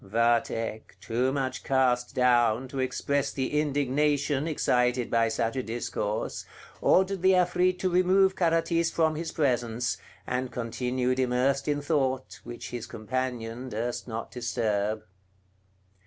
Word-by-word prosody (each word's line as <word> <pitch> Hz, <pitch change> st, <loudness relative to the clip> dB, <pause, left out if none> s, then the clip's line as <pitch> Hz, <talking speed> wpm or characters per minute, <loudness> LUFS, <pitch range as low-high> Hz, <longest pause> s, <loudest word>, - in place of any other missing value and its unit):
Vathek, 115 Hz, +1 st, 0 dB
too 125 Hz, +3 st, 0 dB
much 135 Hz, -2 st, -2 dB
cast 125 Hz, -2 st, +1 dB
down 120 Hz, -1 st, +3 dB
to 135 Hz, -1 st, -5 dB
express 140 Hz, +2 st, 0 dB
the 135 Hz, +2 st, -1 dB
indignation 145 Hz, 0 st, +1 dB
excited 125 Hz, -5 st, +1 dB
by 115 Hz, -1 st, +3 dB
such 115 Hz, +2 st, -1 dB
a 130 Hz, -, 0 dB
discourse, 110 Hz, -2 st, -3 dB, 0.4 s
ordered 190 Hz, 0 st, +3 dB
the 190 Hz, +1 st, +5 dB
Afrit 180 Hz, 0 st, +2 dB
to 185 Hz, -, 0 dB
remove 190 Hz, +2 st, +4 dB
Carathis 165 Hz, -1 st, +2 dB
from 160 Hz, -1 st, +1 dB
his 160 Hz, +1 st, -4 dB
presence, 120 Hz, -4 st, 0 dB, 0.3 s
and 125 Hz, 0 st, -2 dB
continued 125 Hz, +2 st, -1 dB
immersed 130 Hz, +2 st, +1 dB
in 145 Hz, -1 st, 0 dB
thought, 135 Hz, -4 st, -1 dB
which 120 Hz, -, -8 dB
his 120 Hz, -1 st, -5 dB
companion 120 Hz, +1 st, -4 dB
durst 120 Hz, +3 st, -3 dB
not 115 Hz, -1 st, -5 dB
disturb. 110 Hz, -3 st, -1 dB
130 Hz, 125 wpm, -28 LUFS, 120-150 Hz, 0.4 s, the